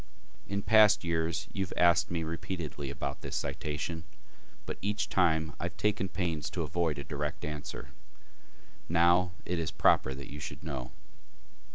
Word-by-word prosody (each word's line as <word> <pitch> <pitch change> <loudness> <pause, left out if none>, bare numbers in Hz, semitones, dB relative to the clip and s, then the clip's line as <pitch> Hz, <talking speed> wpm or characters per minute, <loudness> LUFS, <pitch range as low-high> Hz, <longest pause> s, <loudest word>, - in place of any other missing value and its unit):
In 100 0 -2
past 110 -2 +6
years 80 -1 0
you 100 - 0
have 90 - -6
asked 85 -1 +5
me 85 -2 -1
repeatedly 80 -3 -4
about 70 0 -4
this - - -5
citation, 75 +3 -3 0.6
but - - -5
each 105 +1 -1
time 80 -4 +2
I - - -2
have - - -5
taken 100 -2 +1
pains 85 -6 -2
to - - -2
avoid 85 -3 0
a 70 - -4
direct 75 +1 -3
answer. 75 -1 -6 1.0
Now 85 +2 +4
it 90 -1 -1
is 80 - -1
proper 65 - +3
that 70 0 -9
you 75 - -6
should 75 0 -7
know. 65 -6 -4
80 Hz, 160 wpm, -31 LUFS, 75-90 Hz, 1.0 s, past